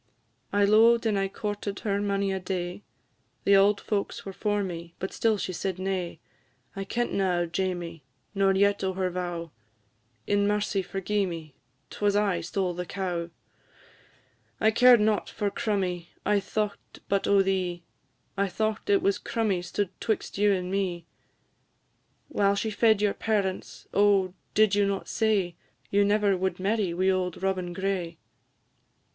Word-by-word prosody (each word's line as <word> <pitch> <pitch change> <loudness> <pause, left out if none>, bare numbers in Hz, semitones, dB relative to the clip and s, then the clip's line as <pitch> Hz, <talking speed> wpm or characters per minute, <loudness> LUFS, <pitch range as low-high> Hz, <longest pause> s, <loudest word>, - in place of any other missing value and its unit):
"I 205 0 +3
lo'ed 230 +3 +5
and 215 -2 +2
I 195 - +1
courted 205 0 -4
her 200 -1 0
mony 200 -1 0
a 190 - -2
day, 180 0 -4 0.6
The 200 - +5
auld 200 +1 +5
folks 205 -2 -3
were 195 - -6
for 205 +1 0
me, 170 -2 -6
but 190 - -5
still 225 -2 +2
she 185 - -3
said 190 +1 -3
nay; 185 -3 -3 0.6
I 195 0 -4
kentna 195 -4 0
o' - - +1
Jamie, 175 -3 -3 0.3
nor 195 -1 +3
yet 200 +1 +2
o' 190 0 0
her 185 -1 -1
vow; 175 -2 -4 0.7
In 205 0 +2
mercy 205 -1 0
forgi'e 195 +1 -1
me, 160 -4 -7 0.4
'twas 205 -1 0
I 200 -4 +2
stole 180 +2 -1
the 180 0 -5
cow! 175 -3 -3 1.3
"I 220 - +4
cared 245 +1 +7
not 210 0 +1
for 205 -2 -2
crummie, 185 -6 -1 0.2
I 205 -1 +3
thought 205 +1 -4
but 200 0 +1
o' 200 -1 +5
thee; 185 -3 -1 0.5
I 200 0 +1
thought 215 - -2
it 395 -3 +4
was 395 0 +2
crummie 215 -7 -1
stood 185 +2 -2
'twixt 220 - -2
you 205 0 +4
and 185 -1 -1
me; 185 -4 -1 1.2
While 200 0 +2
she 220 +2 -1
fed 215 -1 +3
your 205 - +3
parents, 200 -4 -2
oh! 195 -2 +3 0.2
did 215 -2 +4
you 200 0 +3
not 195 -1 -2
say, 200 -6 0 0.3
You 200 0 +4
never 205 -1 +3
would 185 -1 -2
marry 200 -1 0
wi' 185 +2 +2
auld 185 -1 -2
Robin 185 -2 -1
Gray? 180 -2 -2
195 Hz, 155 wpm, -27 LUFS, 185-205 Hz, 1.3 s, cared